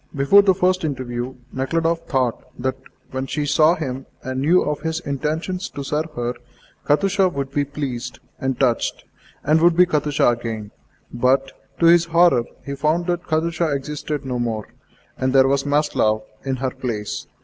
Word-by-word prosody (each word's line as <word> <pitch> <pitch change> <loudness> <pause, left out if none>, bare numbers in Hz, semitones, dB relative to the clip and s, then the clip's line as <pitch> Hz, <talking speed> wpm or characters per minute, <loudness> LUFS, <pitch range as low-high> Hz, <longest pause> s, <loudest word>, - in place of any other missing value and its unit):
Before 140 +9 +6
the 195 -2 +3
first 185 0 +1
interview, 130 -3 -3 0.2
Nekhludoff 165 +5 -1
thought 130 -5 0
that 130 +1 -1 0.4
when 130 +1 -3
she 150 +2 -2
saw 155 +3 +4
him 135 -5 -5 0.2
and 130 0 -3
knew 170 +6 +4
of 150 0 -2
his 160 +1 -2
intention 155 +5 -2
to 145 -7 -6
serve 150 +3 -2
her, 120 0 -2 0.5
Katusha 195 +5 +3
would 140 -5 -4
be 145 0 0
pleased 135 -3 -5 0.2
and 130 -1 -2
touched, 125 -4 +1 0.4
and 155 +2 +3
would 170 0 +4
be 180 - +7
Katusha 150 -4 +1
again; 115 -3 -3 0.4
but, 130 +2 +2 0.3
to 170 - +3
his 170 0 +6
horror, 170 -7 +4 0.2
he 140 - -4
found 155 +5 0
that 175 0 -2
Katusha 165 +1 0
existed 150 +1 -4
no 125 -2 -2
more, 115 -3 -2 0.5
and 130 0 0
there 135 -1 +6
was 140 +1 +1
Maslova 145 -7 +1 0.2
in 135 -1 -1
her 130 0 -2
place. 110 -6 -4
140 Hz, 165 wpm, -21 LUFS, 130-165 Hz, 0.5 s, be